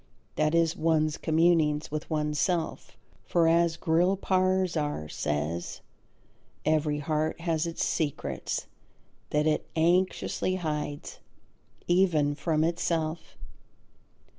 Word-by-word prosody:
That 155 +1 +1
is, 165 0 +2
one's 155 -2 +1
communings 160 -2 +2
with 155 +1 -4
oneself. 155 +2 -1 0.3
For, 170 -1 +2
as 170 0 +3
Grillparzer 180 - +1
says, 75 +4 -3 0.8
every 155 -1 +1
heart 155 +2 -1
has 165 -1 0
its 165 - -2
secrets 150 -4 -2 0.6
that 150 0 +1
it 155 -1 0
anxiously 180 +2 +1
hides 150 -4 -4 0.7
even 175 -5 +3
from 155 +1 0
itself. 165 -1 -2
160 Hz, 90 wpm, -28 LUFS, 150-170 Hz, 0.8 s, as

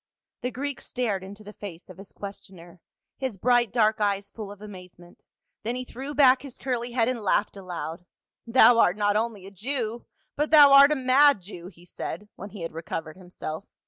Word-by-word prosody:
The 250 - -2
Greek 275 +1 -5
stared 215 -7 -2
into 200 +2 -10
the 210 +1 -11
face 185 -5 -10
of 185 0 -13
his 195 - -11
questioner, 185 -3 -11 0.4
his 260 -7 -3
bright 240 +1 +2
dark 220 -2 +2
eyes 200 -1 -1
full 210 -3 -8
of 205 - -12
amazement, 180 -4 -13 0.4
then 235 +3 -3
he 255 0 -4
threw 270 +4 -7
back 265 -3 +5
his 275 -3 -10
curly 245 -2 -3
head 230 -2 +2
and 255 -1 -1
laughed 205 0 0
aloud. 175 -3 -7 0.2
" - - -55
Thou 240 0 +6
art 180 -3 +4
not 205 -1 +1
only 215 -3 -2
a 195 - -10
Jew, 235 +2 -3 0.3
but 295 +1 -1
thou 290 -3 +8
art 280 +1 +8
a - - +3
mad 265 0 +4
Jew," 180 -2 -10
he 175 -2 -16
said, 205 +3 -7
when 200 - -9
he 205 -3 -10
had 165 - -4
recovered 160 -1 -6
himself. 180 -1 -8
210 Hz, 200 wpm, -26 LUFS, 185-250 Hz, 0.4 s, thou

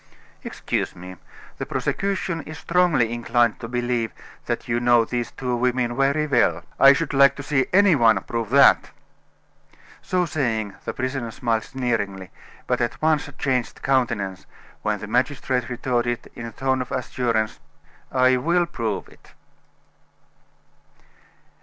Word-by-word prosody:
"Excuse - - -3
me. 90 +1 -10 0.4
The - - -3
prosecution 190 -4 -2
is 155 +2 -9
strongly 165 -10 +2
inclined 120 -1 +1
to 115 - -6
believe 120 -1 -1 0.4
that - - -3
you 120 0 0
know 120 -1 +4
these 120 0 -3
two 125 -2 -3
women 120 0 0
very 140 +3 +2
well." 85 - +2 0.2
"I 135 - +9
should 145 +1 -2
like 140 0 +5
to 140 - -7
see 135 -2 +1
any 195 -2 +5
one 115 -4 +4
prove 115 -3 -3
that!" 140 +3 +5 1.1
So 180 -1 0
saying, 115 - -2
the - - -3
prisoner 130 -2 -3
smiled 115 0 -1
sneeringly, 100 -7 -3 0.3
but 125 0 0
at 120 - -2
once 155 -2 +1
changed 130 -4 -2
countenance 105 - 0 0.3
when 105 -1 -1
the - - -5
magistrate 125 +1 0
retorted 120 -1 -2
in 115 - -7
a - - -8
tone 130 +2 -1
of 125 - -6
assurance: 115 -4 -1 0.5
"I 130 0 +4
will 170 +7 +2
prove 115 -11 -4
it." - - -21
125 Hz, 140 wpm, -23 LUFS, 115-140 Hz, 1.1 s, I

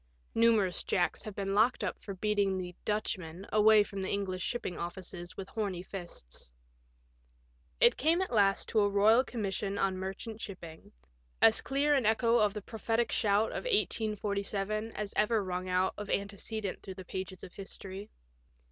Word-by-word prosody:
Numerous 225 -5 +3
Jacks 175 -2 0
have 210 -2 -7
been 195 -1 -2
locked 220 +5 +3
up - - -3
for 200 - -6
beating 200 -1 +1
the 180 -1 -5
" - - -38
Dutchman 190 -4 -2
" - - -14
away 215 0 +7
from 200 -1 -6
the 190 - -2
English 190 -2 -2
shipping 240 -3 -3
offices 175 0 -7
with 190 - -5
horny 195 -5 -3
ffsts. 175 - -9 1.3
It - - +6
came 325 +5 +3
at 375 -8 -2
last 200 -3 +3
to 220 - +2
a 205 -1 +4
Boyal 215 +5 +5
Commission 200 -4 -3
on 190 -1 +1
Merchant 210 +4 -5
Shipping 170 -5 -9 0.2
— - - -38
as - - 0
clear 285 +2 +2
an 265 -6 +3
echo 230 +1 +3
of 210 -1 +2
the 210 - -5
prophetic 225 +2 -1
shout 210 0 +2
of - - -4
1817 215 - 0
as 210 -1 -4
ever 215 0 +2
rung 185 0 -3
out 185 +1 +2
of 210 -1 -6
antecedent 200 +1 -3
through 190 - -8
the 185 -1 -9
pages 185 0 -6
of 180 - -9
history. 195 0 -7
200 Hz, 175 wpm, -31 LUFS, 190-220 Hz, 1.3 s, away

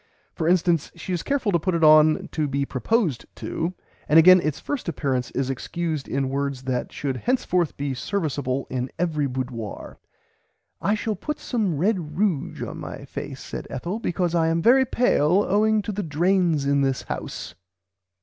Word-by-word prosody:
For 160 - -2
instance, 175 -3 +2
she 185 - -5
is 175 - -1
careful 270 -7 0
to 170 - +2
put 185 +2 0
it 165 - 0
on 155 0 +6
to 155 -2 -1
be 140 0 -1
proposed 155 - 0
to; 170 +3 -3 0.3
and 150 - +6
again 185 +2 +8
its 155 -3 -2
first 280 -10 -3
appearance 130 -5 -1
is 135 0 -1
excused 155 +2 -3
in 135 -1 -1
words 140 -1 -2
that 130 -2 -2
should 135 -3 -3
henceforth 185 - 0
be 140 -1 -2
serviceable 140 -4 -2
in 130 0 -2
every 155 -4 0
boudoir. 125 -4 -5 0.8
"I 205 - +2
shall 215 0 -2
put 300 +6 -4
some 210 - -1
red 195 +7 +2 0.2
ruge 190 -8 0
on - - -7
my - - -7
face - - -7
said - - -7
Ethel 170 - -4
becouse 175 -5 -1
I 165 -2 +3
am 165 +1 +1
very 255 +8 +5
pale 200 -6 +3
owing 215 +2 +3
to 215 - -3
the 205 +1 -3
drains 170 -2 +1
in 140 0 +2
this 135 -1 0
house." - - -6
165 Hz, 175 wpm, -24 LUFS, 140-190 Hz, 0.8 s, again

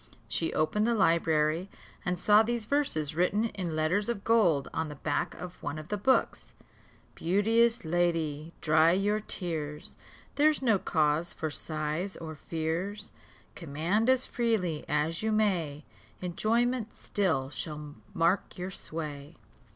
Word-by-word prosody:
She 105 +11 -1
opened 210 +8 +1
the 235 - +2
library, 165 -1 +2 0.3
and 180 0 -1
saw 210 +4 +6
these 235 0 -1
verses 205 - 0
written 200 +7 +1
in 180 -6 -4
letters 180 +8 +1
of 215 -4 -2
gold 175 -12 +3
on 160 0 -1
the 150 - -7
back 145 +1 -2
of 180 0 -9
one 145 +1 -4
of 155 0 -8
the 210 - 0
books: 260 +6 +1 0.6
"Beauteous 225 +5 +2
lady, 165 -2 0
dry 160 +2 +5
your 205 +3 +1
tears, 160 -7 -5 0.4
Here's 305 +1 +4
no 225 -7 +3
cause 155 0 +1
for 155 -1 -3
sighs 155 +5 -3
or 160 -1 -7
fears; 165 +7 -3 0.4
Command 170 - 0
as 260 0 +4
freely 215 -10 -1
as 150 +2 0
you 220 0 0
may, 175 -9 0 0.3
Enjoyment 225 +6 0
still 160 -10 -1
shall 150 -1 -6 0.2
mark 170 +4 +1
your 180 +1 -4
sway." 150 -3 -6
175 Hz, 135 wpm, -29 LUFS, 155-210 Hz, 0.6 s, saw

